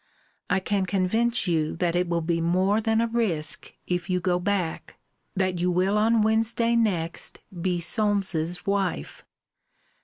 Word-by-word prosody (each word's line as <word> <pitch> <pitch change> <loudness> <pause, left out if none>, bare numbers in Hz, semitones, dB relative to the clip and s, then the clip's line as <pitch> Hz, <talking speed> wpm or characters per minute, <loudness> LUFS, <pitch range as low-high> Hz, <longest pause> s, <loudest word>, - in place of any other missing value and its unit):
I - - +2
can 195 0 -1
convince 220 +6 +1
you 160 -4 0
that 175 0 0
it 180 0 +1
will 170 -1 0
be 165 0 0
more 185 +5 +2
than 225 +1 +2
a 230 - +1
risque 200 -10 -2
if 180 +1 -2
you 180 0 +1
go 180 0 +1
back, 180 -3 -2 0.4
that 185 -2 0
you 180 +1 +1
will 185 +3 +1
on 220 +1 +3
Wednesday 225 +2 +1
next 180 -8 -1 0.2
be 180 0 0
Solmes's 180 -3 0
wife. 195 - -2
185 Hz, 150 wpm, -25 LUFS, 175-215 Hz, 0.4 s, on